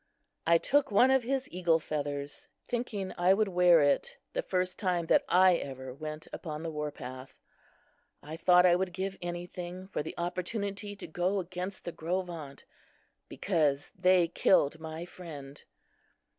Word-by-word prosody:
I 170 0 +6
took 285 - +2
one 245 +6 +5
of 265 -1 +4
his 265 +2 -2
eagle 175 -2 +2
feathers, 145 -2 -4 0.2
thinking 225 -6 -3
I 180 +2 +5
would 210 0 +1
wear 180 -3 +5
it 145 - +1 0.2
the - - 0
first 180 - -2
time 180 -4 0
that - - +4
I 185 -1 +6
ever 130 -3 -7
went 155 +2 -7
upon 155 -1 -5
the 165 - -3
war 150 -1 -3
path. 130 -1 -9 0.9
I 155 +2 -7
thought 180 +1 +5
I 175 -1 +6
would 180 0 -1
give 190 +1 -3
anything 175 +1 -6
for - - -2
the 155 - -7
opportunity 200 +4 -3
to - - -9
go 180 +4 0
against 185 +1 -6
the 175 - -3
Gros 180 +4 -2
Ventres, 155 -6 -9 0.6
because 150 -7 0
they 180 -2 +4
killed 160 -2 +3
my 160 +1 -6
friend. 145 -6 -10
175 Hz, 155 wpm, -30 LUFS, 155-190 Hz, 0.9 s, I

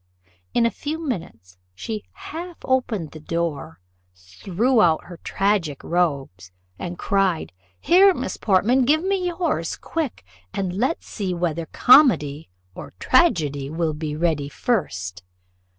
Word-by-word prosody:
In 235 - +4
a 230 - +2
few 300 +9 -4
minutes 115 - -6 0.2
she 215 - -5
half 360 -3 -8
opened 230 - 0
the 155 - -10
door, 165 -1 -3 0.4
threw 180 - 0
out 165 -4 +3
her 175 -1 -11
tragic 195 -8 0
robes, 140 - -1 0.3
and 175 0 -5
cried, 190 - 0 0.3
"Here, 385 +3 +6
Miss 255 - -4
Portman, 220 +6 +3
give 310 +5 +3
me 380 -1 0
yours 345 0 -2
quick 305 - -4 0.3
and 190 -2 -2
let's 255 - -1
see 190 -4 -3
whether 170 -2 -2
comedy 165 - +4 0.2
or - - -10
tragedy 145 - +2
will 160 0 -1
be 150 -1 -4
ready 155 -3 0
first." 95 - -2
180 Hz, 130 wpm, -23 LUFS, 150-255 Hz, 0.4 s, Here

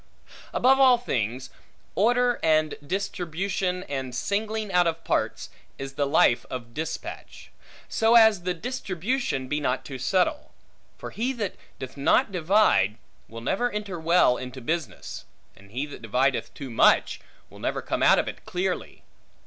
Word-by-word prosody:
Above 265 +2 +4
all 260 -2 +7
things, 130 - -3 0.4
order, 245 +5 +2
and 155 -1 +2
distribution, 185 +1 -2
and 135 -7 -5
singling 215 - -2
out 180 -1 +4
of 165 0 -2
parts, - - -1 0.3
is 135 0 -6
the 145 0 0
life 125 -3 +4
of 115 -2 -7
dispatch; 160 +3 -6 0.4
so 225 +1 +3
as 220 -5 +6
the 180 0 -2
distribution 205 - -2
be 150 +3 -1
not 130 -3 -1
too 135 -2 -7
subtle: 195 - 0 0.4
for - - -8
he 245 +4 -1
that 220 -7 -3 0.2
doth 130 +1 -8
not 210 - +3
divide, 170 - +3 0.3
will 115 0 -9
never 220 - 0
enter 205 -5 -5
well 165 -6 +4
into 130 +1 -7
business; 160 +5 -4 0.3
and 100 +1 -18
he 130 +7 -3
that 145 - -10
divideth 125 +5 0
too 135 -3 -7
much, 115 - +4 0.3
will - - -13
never - - -2
come - - -2
out - - +6
of - - 0
it - - -7
clearly. 180 +1 -3
170 Hz, 150 wpm, -26 LUFS, 135-210 Hz, 0.4 s, all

